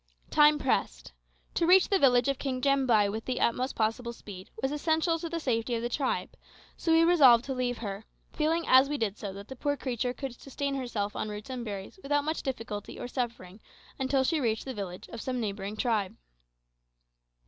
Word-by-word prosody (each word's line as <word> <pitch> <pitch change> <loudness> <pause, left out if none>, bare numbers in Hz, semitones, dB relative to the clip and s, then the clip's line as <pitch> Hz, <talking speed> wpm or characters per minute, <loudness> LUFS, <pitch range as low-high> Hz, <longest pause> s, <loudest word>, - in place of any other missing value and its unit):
Time 300 0 +6
pressed. - - -1 0.4
To 335 - +1
reach 370 +1 +6
the 390 - +3
village 245 -4 +4
of 275 -1 0
King 260 -2 -2
Jambai 255 -6 +3
with 220 +2 -5
the 255 -1 -2
utmost 255 +3 0
possible 225 +2 -1
speed 190 -5 -11
was 265 +3 -1
essential 320 +2 +1
to 335 - -5
the 335 0 -3
safety 240 -4 -1
of 230 - -3
the 240 - -1
tribe, 265 +2 -1 0.4
so 330 - -1
we 325 0 +6
resolved 270 -9 +6
to 270 - -3
leave 250 -1 -1
her, 200 -2 -5 0.3
feeling 325 +2 +1
as 260 +2 +6
we 295 - -1
did 215 -6 -1
so 200 - -5
that 200 +1 -9
the 265 - -8
poor 285 +3 -1
creature 245 -2 -2
could 265 0 -6
sustain 280 +1 -3
herself 235 -6 -3
on 215 - -3
roots 210 +4 -7
and 250 -2 -4
berries 200 - -7
without 290 -1 +1
much 315 +2 -2
difficulty 225 -6 -5
or - - -4
suffering 230 -7 -4 0.4
until 265 0 +2
she 320 +4 +1
reached 225 -3 0
the 265 - -4
village 190 -5 -6
of 230 - -7
some 255 -1 -2
neighbouring 205 -1 -4
tribe. 215 -6 0
250 Hz, 200 wpm, -29 LUFS, 220-280 Hz, 0.4 s, Time